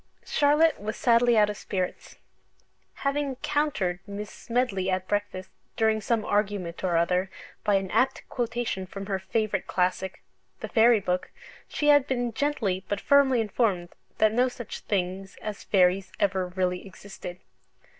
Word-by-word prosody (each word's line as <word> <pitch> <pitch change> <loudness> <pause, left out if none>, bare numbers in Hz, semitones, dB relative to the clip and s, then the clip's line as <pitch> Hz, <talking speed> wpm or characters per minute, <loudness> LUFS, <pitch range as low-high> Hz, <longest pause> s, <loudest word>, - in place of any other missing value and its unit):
Charlotte 300 +2 +3
was 215 +1 -4
sadly 235 -1 +4
out 210 -1 +6
of - - -7
spirits. 185 -2 -4 0.9
Having 280 -1 0
"countered" 285 -12 0
Miss 200 +1 -6
Smedley 230 -6 -1
at 185 0 -1
breakfast, 205 -2 -2 0.3
during 220 -1 +2
some 225 0 0
argument 200 -5 -1
or 175 -2 +2
other, 180 +3 +1 0.3
by 205 -2 +3
an 195 -1 -1
apt 265 +1 +1
quotation 235 -5 -2
from 195 +1 -7
her 195 -1 -2
favourite 210 -1 -1
classic 185 +1 -1 0.4
(the - - -5
Fairy 230 0 +5
Book) 180 -1 -1 0.4
she 295 - 0
had 290 -2 +6
been 245 -3 -1
gently 220 -9 -1
but 205 - -1
firmly 270 -2 +4
informed 205 -5 0 0.3
that 215 0 +4
no 250 +2 +3
such 245 -3 -7
things 190 0 -3
as 215 -2 -6
fairies 185 0 +3
ever 190 -2 +1
really 180 0 -1
existed. 185 -2 -9
205 Hz, 145 wpm, -27 LUFS, 185-240 Hz, 0.9 s, out